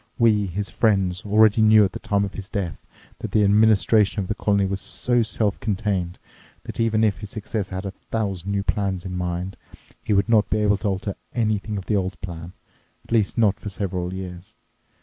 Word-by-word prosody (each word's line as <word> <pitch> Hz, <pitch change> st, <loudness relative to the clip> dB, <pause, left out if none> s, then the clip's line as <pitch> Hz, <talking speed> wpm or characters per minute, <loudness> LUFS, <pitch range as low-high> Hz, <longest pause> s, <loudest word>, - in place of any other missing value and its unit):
We, 110 Hz, -5 st, +3 dB
his 95 Hz, 0 st, -4 dB
friends, 95 Hz, -4 st, +1 dB
already 110 Hz, +1 st, +5 dB
knew 110 Hz, -1 st, +7 dB
at 95 Hz, -, -2 dB
the -, -, -7 dB
time 100 Hz, -1 st, 0 dB
of 100 Hz, -, -7 dB
his 100 Hz, +1 st, -8 dB
death 95 Hz, -7 st, -4 dB, 0.3 s
that -, -, -6 dB
the 105 Hz, -, +4 dB
administration 105 Hz, 0 st, +4 dB
of 95 Hz, -, -3 dB
the -, -, +1 dB
colony 100 Hz, -2 st, +1 dB
was 95 Hz, 0 st, -3 dB
so 120 Hz, -1 st, 0 dB
self 110 Hz, -2 st, 0 dB
contained 100 Hz, -4 st, -2 dB, 0.5 s
that -, -, -8 dB
even 110 Hz, -1 st, +2 dB
if 105 Hz, -3 st, +1 dB
his 105 Hz, 0 st, -7 dB
successor 105 Hz, -3 st, -4 dB
had 95 Hz, +2 st, -4 dB
a 100 Hz, -, -3 dB
thousand 100 Hz, -2 st, -4 dB
new 100 Hz, 0 st, 0 dB
plans 100 Hz, -3 st, -1 dB
in 90 Hz, -1 st, -4 dB
mind, 90 Hz, +1 st, -3 dB, 0.5 s
he -, -, 0 dB
would 100 Hz, +1 st, +3 dB
not 110 Hz, -2 st, +3 dB
be -, -, +1 dB
able 105 Hz, -1 st, +2 dB
to 105 Hz, -, -3 dB
alter 95 Hz, 0 st, -2 dB, 0.2 s
anything 110 Hz, -2 st, 0 dB
of 95 Hz, -, -6 dB
the 105 Hz, -, +1 dB
old 95 Hz, -1 st, -3 dB
plan, 85 Hz, -1 st, -7 dB, 0.5 s
at -, -, -19 dB
least 110 Hz, -3 st, +1 dB
not 110 Hz, -4 st, +3 dB
for 105 Hz, -, -6 dB
several 90 Hz, -2 st, -3 dB
years. 95 Hz, -1 st, -8 dB
100 Hz, 205 wpm, -23 LUFS, 95-110 Hz, 0.5 s, knew